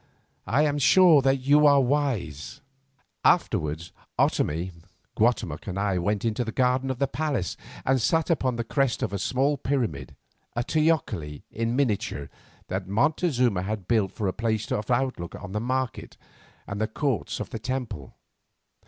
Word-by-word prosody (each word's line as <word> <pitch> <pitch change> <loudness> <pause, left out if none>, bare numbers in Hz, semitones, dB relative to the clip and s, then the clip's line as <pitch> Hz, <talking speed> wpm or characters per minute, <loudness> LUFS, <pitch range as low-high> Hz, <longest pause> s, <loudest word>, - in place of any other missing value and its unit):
"I 140 +5 +3
am 145 -1 +1
sure 165 +1 +6
that 135 0 +2
you 145 +3 +5
are 140 -1 +6
wise." 125 - -1 0.6
Afterwards 75 +2 +1 0.3
Otomie, 85 +5 +1 0.4
Guatemoc, 105 -9 0
and 95 -1 -4
I 100 -2 0
went 100 +4 -1
into 115 +2 0
the 110 - -4
garden 130 +2 +1
of 130 - -2
the 140 - +2
palace 140 - -2 0.3
and 130 -1 +2
sat 165 +7 +2
upon 130 -6 +1
the 115 - -2
crest 135 +1 0
of - - -2
a 100 - -2
small 135 +7 +1
pyramid, 115 - -2 0.4
a 120 - 0
teocalli 125 - 0
in 115 +2 -1
miniature 105 - -1 0.4
that 95 0 -3
Montezuma 125 - +1
had 100 -1 -4
built 110 -5 +2
for 105 - -3
a 95 - 0
place 110 -1 -2
of 105 +2 -2
outlook 125 -9 -1
on 90 - -8
the 105 - -1
market 130 +1 -3 0.5
and 100 +1 -5
the 110 - +1
courts 125 - -2
of - - -5
the 115 - -4
temple. 120 - -5
120 Hz, 160 wpm, -26 LUFS, 100-135 Hz, 0.6 s, sure